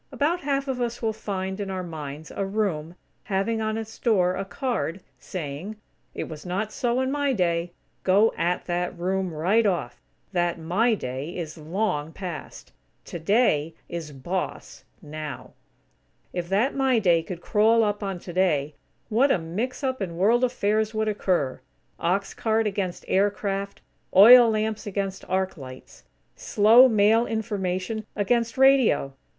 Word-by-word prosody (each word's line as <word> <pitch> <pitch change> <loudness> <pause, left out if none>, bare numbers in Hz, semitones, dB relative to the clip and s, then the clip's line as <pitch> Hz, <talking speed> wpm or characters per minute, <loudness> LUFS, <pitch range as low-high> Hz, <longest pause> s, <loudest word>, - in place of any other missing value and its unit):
About 320 +5 0
half 275 -1 -1
of 255 -2 -2
us 240 0 -2
will 220 -1 +1
find, 190 -2 -4
in 200 -1 -3
our 185 -1 -3
minds, 155 -2 -7
a 200 - -1
room, 195 -5 -2 0.3
having 210 +3 -1
on 220 0 -1
its 220 0 -7
door 185 -6 +2
a 195 - -2
card, 195 - -3 0.2
saying: 170 +4 -6 0.4
"It - - -3
Was 155 -2 -8
Not 195 +4 -3
So 245 +1 0
In 260 0 -1
My 285 -1 +1
Day." 170 -4 0 0.3
Go 200 +4 +4
at 175 +1 -1
that 175 0 -2
room, 185 +1 -1
right 180 +9 +2
off. 170 - -1 0.3
That 175 -2 0
"My 195 +9 +1
Day" 135 +1 -5
is 160 -3 -5
long 160 -1 -2
past. 180 -5 -8 0.3
"Today" 165 -3 +1
is 165 -3 -6
boss, 175 +7 -5 0.2
now. 150 -2 -7 0.8
If 175 -1 -4
that 215 +8 +2
"My 265 -3 +2
Day" 175 -6 +3
could 175 +1 -7
crawl 225 +4 +3
up 205 0 -1
on 195 -2 -3
"Today," 170 -5 0 0.3
what 245 +6 +3
a - - +3
mix 210 - -4
up 260 -3 -1
in 170 -3 -4
World 225 +7 +3
affairs 220 -3 0
would 220 0 0
occur! 180 -10 -1 0.4
Ox 190 +4 0
cart 225 0 0
against 195 -3 -3
aircraft; 200 0 -1 0.3
oil 235 +5 +9
lamps 215 -1 -1
against 195 -1 -3
arc 190 0 -1
lights! 130 -2 -12 0.3
Slow, 225 +5 +6
mail 220 +1 +3
information 210 -1 -2
against 230 +4 0
radio! 265 - +4
195 Hz, 150 wpm, -25 LUFS, 175-220 Hz, 0.8 s, oil